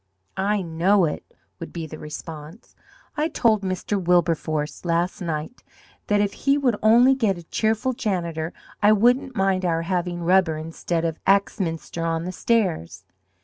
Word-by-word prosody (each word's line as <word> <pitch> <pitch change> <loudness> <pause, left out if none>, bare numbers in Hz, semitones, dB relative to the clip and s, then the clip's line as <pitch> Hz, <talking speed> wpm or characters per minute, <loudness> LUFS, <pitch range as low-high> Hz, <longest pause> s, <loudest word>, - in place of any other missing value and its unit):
"I 200 +1 0
know 175 +3 +2
it," 150 - -3 0.4
would 170 - -7
be 165 -2 -5
the 155 0 -9
response. 155 +4 -9 0.4
"I 305 +1 +1
told 220 -9 +2
Mr. 190 +1 -2
Wilberforce 165 -4 0
last 175 +2 -1
night 160 +5 -4 0.5
that 205 0 +2
if 205 -1 +1
he 275 +1 +1
would 255 -6 +2
only 240 +5 +6
get 220 -8 +1
a 175 - -10
cheerful 220 +8 0
janitor 170 -9 -2 0.3
I 210 +1 +6
wouldn't 245 +4 +2
mind 190 -2 +1
our 165 -2 0
having 175 -1 -2
rubber 180 -2 +3
instead 165 +1 -3
of 165 -1 -3
Axminster 185 -4 0
on 165 0 -1
the 180 - -3
stairs." 175 - -1
180 Hz, 150 wpm, -23 LUFS, 165-210 Hz, 0.5 s, only